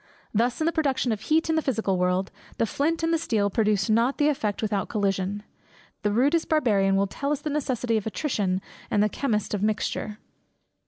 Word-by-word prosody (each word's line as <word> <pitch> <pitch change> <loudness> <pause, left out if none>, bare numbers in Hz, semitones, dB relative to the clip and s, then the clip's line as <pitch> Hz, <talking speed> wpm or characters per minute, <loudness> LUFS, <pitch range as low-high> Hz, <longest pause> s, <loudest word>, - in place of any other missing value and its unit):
Thus 235 +3 +1
in 315 - +1
the 335 - +3
production 270 -6 0
of 215 -2 -2
heat 320 +5 +2
in 320 - +1
the 320 - +2
physical 220 -9 0
world, 180 +1 0 0.3
the - - +2
flint 320 +8 -1
and 330 0 +2
the 330 - +2
steel 210 -9 0
produce 210 -2 +1
not 230 +5 +2
the 295 0 +3
effect 220 -8 -1
without 205 -3 -1
collision; 200 0 -1 0.6
the 210 - +1
rudest 285 +9 +2
Barbarian 205 -11 +3
will 195 +1 +3
tell 280 +8 -3
us 295 - -1
the 300 - -3
necessity 250 -5 0
of 215 - -3
attrition, 205 -7 -1 0.3
and 205 - +3
the 210 - +2
chemist 215 -4 -1
of 205 - -1
mixture. 215 0 -1
220 Hz, 200 wpm, -26 LUFS, 205-285 Hz, 0.6 s, the